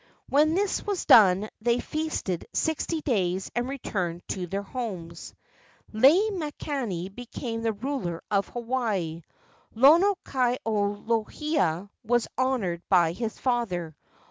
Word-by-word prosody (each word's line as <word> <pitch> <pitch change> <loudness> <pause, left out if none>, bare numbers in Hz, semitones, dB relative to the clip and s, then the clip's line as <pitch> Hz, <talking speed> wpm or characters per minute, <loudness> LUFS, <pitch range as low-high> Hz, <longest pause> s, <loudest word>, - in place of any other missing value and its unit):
When 305 +3 +4
this 400 +1 0
was 405 -3 -2
done 200 -2 +6
they 240 +2 +2
feasted 310 - -3
sixty 320 +1 -1
days 190 -9 -1
and 240 +2 -1
returned 180 -10 -3
to 180 -2 -3
their 195 +3 -3
homes. 190 -8 -6 0.6
Lei 315 - +5
makani 280 - -3
became 235 0 -5
the 225 -1 0
ruler 210 -7 -4
of 200 -1 +2
Hawaii. 225 -9 -2 0.5
Lono 330 - +6
kai 250 -2 0
o 205 -2 0
lohia 225 - 0 0.2
was 240 +1 +1
honored 240 -10 0
by 175 -4 +4
his 225 +5 -4
father. 180 - -1
230 Hz, 120 wpm, -27 LUFS, 185-270 Hz, 0.6 s, done